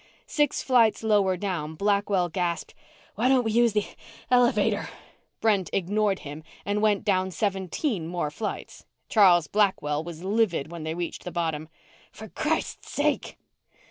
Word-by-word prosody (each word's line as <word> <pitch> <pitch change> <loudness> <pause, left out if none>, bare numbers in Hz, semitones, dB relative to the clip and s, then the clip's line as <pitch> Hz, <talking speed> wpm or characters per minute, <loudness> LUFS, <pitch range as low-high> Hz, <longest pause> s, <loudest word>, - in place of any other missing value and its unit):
Six 295 -1 0
flights 235 -4 +3
lower 200 -4 +3
down, 170 -5 -3
Blackwell 200 -1 +1
gasped, 175 0 -2 0.4
"Why 235 +5 +1
don't 260 -2 +4
we 225 - -1
use 235 0 +3
the 210 -1 +1 0.5
el 245 -1 +6
elevator?" 240 - 0 0.5
Brent 205 -5 +2
ignored 200 +1 0
him 145 +2 -7 0.2
and 205 +1 0
went 210 -2 +2
down 190 -2 +2
seventeen 190 - -2
more 170 -3 -2
flights. 210 +7 -6 0.2
Charles 180 -6 +5
Blackwell 155 -6 +1
was 170 0 -8
livid 190 -7 0
when 170 -1 -7
they 160 +1 -3
reached 175 0 -5
the 180 - -6
bottom. 160 -2 -2 0.4
"For - - -10
Christ - - -2
sake - - -1
195 Hz, 145 wpm, -26 LUFS, 170-215 Hz, 0.5 s, el